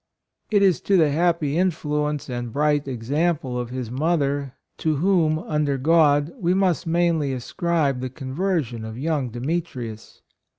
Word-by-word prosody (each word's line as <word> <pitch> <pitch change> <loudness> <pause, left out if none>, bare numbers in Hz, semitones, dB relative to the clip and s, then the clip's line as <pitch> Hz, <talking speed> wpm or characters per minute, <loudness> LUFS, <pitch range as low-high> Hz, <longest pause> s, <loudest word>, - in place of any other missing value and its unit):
It 205 -2 +3
is 190 -3 +3
to 195 - +2
the 155 -4 +4
happy 165 -1 +1
influence 150 -5 -1
and 120 -2 -4
bright 145 +1 +1
exam 145 +7 0
ple 125 -3 -5
of 120 -1 -4
his 125 -2 -5
mother, 140 -2 0 0.3
to 155 -1 +1
whom, 165 -1 +2
under 150 -3 -1
God, 145 +1 +3
we 180 -2 +1
must 185 -3 +1
mainly 165 -4 +1
ascribe 140 +2 -1
the 130 0 -3
conversion 135 - -2
of 110 +1 -7
young 145 -2 -1
Demetrius. 125 -3 -5
150 Hz, 145 wpm, -23 LUFS, 130-170 Hz, 0.3 s, the